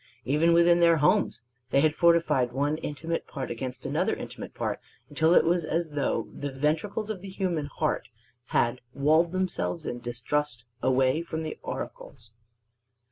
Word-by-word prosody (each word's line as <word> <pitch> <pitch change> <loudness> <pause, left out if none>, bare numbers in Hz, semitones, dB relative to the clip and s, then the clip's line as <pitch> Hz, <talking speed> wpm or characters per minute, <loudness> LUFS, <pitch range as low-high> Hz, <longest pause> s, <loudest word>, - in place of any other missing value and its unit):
Even 150 +6 +3
within 170 0 +5
their 170 -1 +5
homes 150 -5 +2 0.3
they 135 - +3
had 155 0 +3
fortified 165 -8 +3
one 145 +3 0
intimate 165 +2 -4
part 135 -3 -5
against 125 +1 -5
another - - 0
intimate - - -8
part - - -2 0.3
until 160 +3 +3
it - - +6
was 170 +1 +2
as 165 +2 -1
though 145 -2 -1
the 145 - -4
ventricles 160 +10 -1
of 195 -4 -6
the 195 - -8
human 180 -6 -2
heart 135 - -2 0.4
had 120 -1 +1
walled 155 +4 +3
themselves 185 -3 -2
in 120 - -4
distrust 120 +2 -2 0.2
away 130 +3 +2
from 160 -1 -4
the 155 - -4
auricles. 110 -1 -7
155 Hz, 155 wpm, -27 LUFS, 130-170 Hz, 0.4 s, it